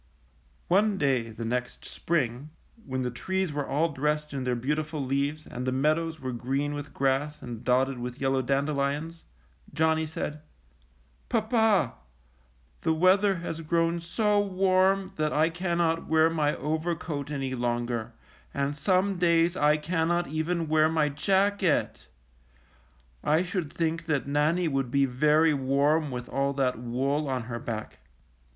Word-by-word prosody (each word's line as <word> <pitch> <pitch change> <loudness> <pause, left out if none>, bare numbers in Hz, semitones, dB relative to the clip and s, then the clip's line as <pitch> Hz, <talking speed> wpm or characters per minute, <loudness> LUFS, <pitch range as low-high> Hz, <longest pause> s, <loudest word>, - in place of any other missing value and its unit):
One 200 +3 +3
day 130 -8 +1
the 115 +1 -6
next 125 +1 -3
spring, 140 -4 -2 0.4
when 130 -1 -2
the 125 - -2
trees 190 +6 -2
were 145 -1 -2
all 155 +5 +1
dressed 150 +1 -1
in 135 -2 -3
their 125 -1 +1
beautiful 150 +3 -2
leaves 140 +3 -1
and 125 - -6
the - - +1
meadows 155 +4 0
were 130 -1 -4
green 135 +4 -2
with 145 0 -6
grass 140 +3 0
and 120 -3 -8
dotted 130 +1 +1
with 125 +2 -6
yellow 135 -1 +1
dandelions, 140 +4 -1 0.5
Johnny 160 +1 +1
said: 150 -1 -5 0.9
"Papa, 220 - +2 0.9
the 160 - +2
weather 190 +4 +4
has 165 0 -4
grown 165 +1 +1
so 205 +5 +1
warm 190 0 +2
that 155 -1 0
I 155 +2 +2
cannot 170 -1 0
wear 160 +1 +4
my 150 -2 +1
overcoat 155 -2 -3
any 135 -3 -3
longer, 120 -1 -2 0.4
and 140 +1 -1
some 185 +3 +1
days 170 0 +3
I 150 -3 +3
cannot 170 +2 0
even 160 +2 -1
wear 155 0 +4
my 155 -2 +2
jacket. 195 +3 +1 1.2
I 155 +4 +3
should 180 -4 -3
think 165 0 -2
that 145 -6 0
Nannie 150 +5 +1
would 135 -4 -1
be 140 +2 +3
very 150 +5 +3
warm 140 +3 +1
with 125 -1 -5
all 140 0 0
that 130 -3 0
wool 135 +5 -1
on 130 -2 -1
her 120 0 -5
back. 110 -2 -6
150 Hz, 145 wpm, -27 LUFS, 135-165 Hz, 1.2 s, weather